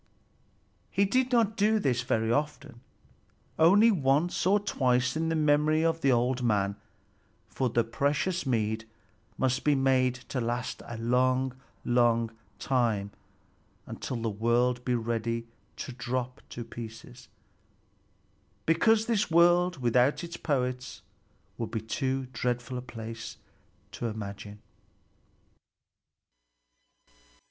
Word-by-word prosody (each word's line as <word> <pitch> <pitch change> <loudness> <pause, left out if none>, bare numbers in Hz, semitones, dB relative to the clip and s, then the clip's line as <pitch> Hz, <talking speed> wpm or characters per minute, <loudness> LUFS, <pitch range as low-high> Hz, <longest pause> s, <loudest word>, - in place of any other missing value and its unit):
He 200 - +2
did 255 +5 +1
not 225 -3 +3
do 215 0 +3
this 125 - 0
often, 125 +3 -1 0.8
only 200 +8 +6
once 155 +1 +1
or 205 +2 +4
twice 125 -10 +1
in 160 +1 0
the 165 - 0
memory 155 +1 +3
of 165 0 0
an 135 - +4
old 125 +1 +2
man; 100 -4 +1 0.7
for 130 - -1
the 120 +1 +2
precious 140 +9 0
mead 110 -4 -1 0.5
must 130 0 0
be 150 -1 +3
made 130 -2 +2 0.2
to 130 - 0
last 120 +1 -3
a 120 - -6
long, 130 +2 +1 0.3
long 120 -1 +2 0.3
time, 115 -6 0 0.7
until - - -5
the 115 -1 -2
world 120 +3 +1
be 125 -1 0
ready 115 0 -2 0.3
to - - -5
drop 125 +1 -4
to 120 - -6
pieces, 120 +2 -10 1.4
because 215 +7 +3
this 220 -4 +1
world 175 +1 +4
without 125 +6 +3
its 170 0 -6
poets 125 -3 -2 0.6
would 115 - -3
be 115 - -2
too 130 +4 -2
dreadful 125 +1 -2
a - - -6
place 115 -1 -8 0.5
to 120 - -4
imagine. 105 -1 -7
125 Hz, 115 wpm, -28 LUFS, 115-155 Hz, 1.4 s, only